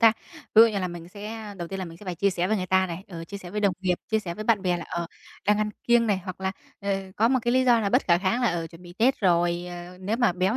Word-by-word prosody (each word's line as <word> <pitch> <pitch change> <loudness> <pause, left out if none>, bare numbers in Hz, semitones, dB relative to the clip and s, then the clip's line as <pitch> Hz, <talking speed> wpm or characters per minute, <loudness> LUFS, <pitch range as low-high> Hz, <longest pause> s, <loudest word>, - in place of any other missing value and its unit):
ta. 225 -2 +7 0.4
Ví 220 - +10
dụ 230 - +7
như 210 -3 -2
là 185 -1 -1
mình 170 -1 -8
sẽ 210 +2 -7
đầu 175 -2 -5
tiên 195 - -5
là 190 - -3
mình 165 -1 -10
sẽ 210 - -13
phải 180 -2 -3
chia 200 +4 +2
sẻ 180 0 0
với 215 - +2
người 185 -2 -2
ta 190 0 +3
này, 175 +1 -6
ờ, 165 -3 -7
chia 200 - -8
sẻ 180 -2 -10
với 210 +2 -2
đồng 200 -3 +3
nghiệp, 180 -1 +2 0.2
chia 220 - +3
sẻ 175 -5 -5
với 215 +2 -6
bạn 215 -4 +3
bè 180 -2 +1
là, 170 - -6
ờ, 170 0 -3 0.4
đang 210 0 +4
ăn 215 0 0
kiêng 240 -1 +4
này, 200 -3 +1
hoặc 185 0 -7
là, 190 0 -1 0.3
ờ, 200 - -5 0.3
có 225 +2 +4
một 260 +1 +3
cái 240 +1 +1
lý 260 0 +3
do 240 -2 +5
là 200 - 0
bất 250 +6 +3
khả 170 -1 +4
kháng 195 +7 0
là, 240 - +4
ờ, 170 -1 -2
chuẩn 165 +1 -14
bị 175 -1 -11
Tết 250 +4 +3
rồi, 175 -2 +2
ờ, 175 +1 -9
nếu 205 +5 -1
mà 240 -6 +3
béo 185 +6 +1
190 Hz, 330 wpm, -26 LUFS, 175-220 Hz, 0.4 s, Ví